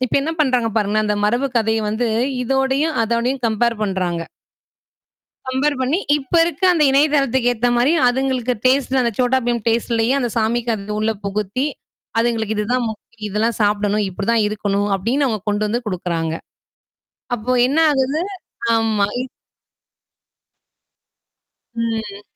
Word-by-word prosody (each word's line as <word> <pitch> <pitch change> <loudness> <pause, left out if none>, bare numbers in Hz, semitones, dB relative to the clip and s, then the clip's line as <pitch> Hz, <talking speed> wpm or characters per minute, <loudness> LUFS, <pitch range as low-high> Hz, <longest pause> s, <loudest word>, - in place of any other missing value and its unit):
இப்ப - - 0
என்ன 310 - -2
பண்றாங்க 250 -4 +1
பாருங்களே 210 +1 +1
அந்த 210 - +1
மரபு 245 +5 +1
கதைய 220 0 +1
வந்து 235 +2 -1 0.4
இதோடயும், 270 +5 +1
அதோடயும் 240 +3 -1
கம்பேர் 225 0 0
பண்றாங்க. 180 -4 -2 1.2
கம்பேர் 270 +3 0
பண்ணி, 265 +7 +1 0.2
இப்ப 270 +2 -13
இருக்க 340 +1 -3
அந்த 330 -4 +2
இணையதளத்துக்கு 275 -3 +3
ஏத்த 240 +2 0
மாரி 255 +6 +3 0.2
அதுங்களுக்கு 255 -1 0
டேஸ்ட் 265 0 +2
அந்த 235 -2 +1
Chhota 255 +1 +3
Bheem 240 -1 +1
டேஸ்ட்லயே 230 +1 +1
அந்த 245 -3 0
சாமிக்கு 230 +1 +1
அத 205 0 -7
உள்ள 220 +1 +1
புகுத்தி, 210 +6 -1 0.5
அதுங்களுக்கு 225 -2 0
இதுதான் 240 +4 0
முக்கியாம் 220 0 -10
இதெல்லாம் 215 +3 -1
சாப்பிடணும் 205 0 +1
இப்டிதான் 205 +4 0
இருக்கணும். 205 -1 -1
அப்டின்னு 250 +9 0
அவுங்க 215 -5 -1
கொண்டு 205 +1 0
வந்து 235 +3 -1
குடுக்குறாங்க. 170 -4 -2 1.0
அப்போ 240 +3 -2
என்ன 280 +5 0
ஆகுது 275 +3 0 0.5
ஆமா. 220 -3 +1 2.7
ம். 225 -3 -3
230 Hz, 130 wpm, -19 LUFS, 210-260 Hz, 2.7 s, இணையதளத்துக்கு